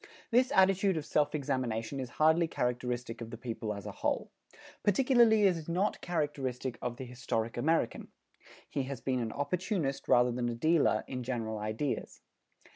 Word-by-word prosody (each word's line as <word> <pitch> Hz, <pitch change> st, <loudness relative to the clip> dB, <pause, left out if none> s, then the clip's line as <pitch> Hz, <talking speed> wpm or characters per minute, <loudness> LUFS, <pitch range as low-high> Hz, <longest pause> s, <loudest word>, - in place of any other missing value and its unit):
This 255 Hz, +3 st, +4 dB
attitude 190 Hz, -1 st, +4 dB
of 150 Hz, -, -3 dB
self 150 Hz, 0 st, +1 dB
examination 130 Hz, -3 st, -2 dB
is 130 Hz, -2 st, -4 dB
hardly 160 Hz, +2 st, +4 dB
characteristic 125 Hz, -3 st, -2 dB
of 115 Hz, -, -6 dB
the 115 Hz, -, -7 dB
people 115 Hz, -2 st, -4 dB
as 100 Hz, -2 st, -6 dB
a -, -, -4 dB
whole. -, -, -2 dB, 0.5 s
Particularly 225 Hz, 0 st, +4 dB
it 190 Hz, -3 st, +5 dB
is 165 Hz, -1 st, -7 dB
not 185 Hz, +5 st, 0 dB
characteristic 135 Hz, -7 st, -2 dB
of 120 Hz, -1 st, -3 dB
the 130 Hz, -, -6 dB
historic 115 Hz, -2 st, -3 dB
American. 155 Hz, 0 st, 0 dB, 0.6 s
He 140 Hz, -, -2 dB
has 135 Hz, -2 st, -5 dB
been 130 Hz, -1 st, -1 dB
an 115 Hz, -2 st, -2 dB
opportunist 160 Hz, -, -2 dB
rather 125 Hz, 0 st, +5 dB
than 120 Hz, 0 st, -1 dB
a 120 Hz, -, -3 dB
dealer 155 Hz, +6 st, +3 dB
in 130 Hz, -1 st, -4 dB
general 115 Hz, -3 st, -3 dB
ideas. 110 Hz, +7 st, -3 dB
130 Hz, 165 wpm, -31 LUFS, 120-165 Hz, 0.6 s, it